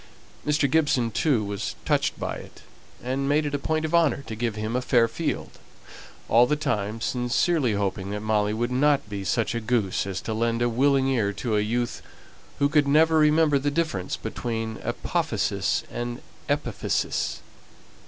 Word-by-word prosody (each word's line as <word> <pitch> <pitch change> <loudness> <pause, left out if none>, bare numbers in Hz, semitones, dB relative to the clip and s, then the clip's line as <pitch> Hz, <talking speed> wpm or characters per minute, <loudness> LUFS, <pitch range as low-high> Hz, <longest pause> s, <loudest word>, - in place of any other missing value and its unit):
Mr. 150 -1 +3
Gibson 135 -5 +2
too 125 -2 +1
was 100 -1 -4
touched - - +1
by - - -3
it, - - -13 0.4
and 135 +2 -1
made 150 +1 +2
it 145 - -3
a 145 - 0
point 155 +2 -1
of 160 - -4
honour 165 -4 +3
to 110 - -6
give 115 -1 -2
him 110 +2 -3
a 125 - +1
fair 120 -2 +3
field, 155 +7 -4 0.7
all 120 +2 +5
the 150 - +2
time 115 -8 -2
sincerely 125 +3 +1
hoping 100 -1 -2
that 105 +1 -4
Molly 105 -1 +1
would 120 +3 -1
not 140 0 +2
be 100 -1 -4
such 110 +4 0
a 115 - -2
goose 110 -5 0
as 95 -1 -3
to 110 - -4
lend 115 +1 0
a 120 - +2
willing 135 +3 +3
ear 115 -7 +1
to 110 +1 -2
a - - +3
youth 120 +3 -2 0.6
who 140 - +3
could 145 -1 +3
never 160 +2 +4
remember 150 -1 +4
the 145 +2 0
difference 145 - -2
between 115 -2 -4
apophysis - - -1
and 120 0 -5 0.3
epiphysis. - - -1
120 Hz, 175 wpm, -25 LUFS, 110-145 Hz, 0.7 s, all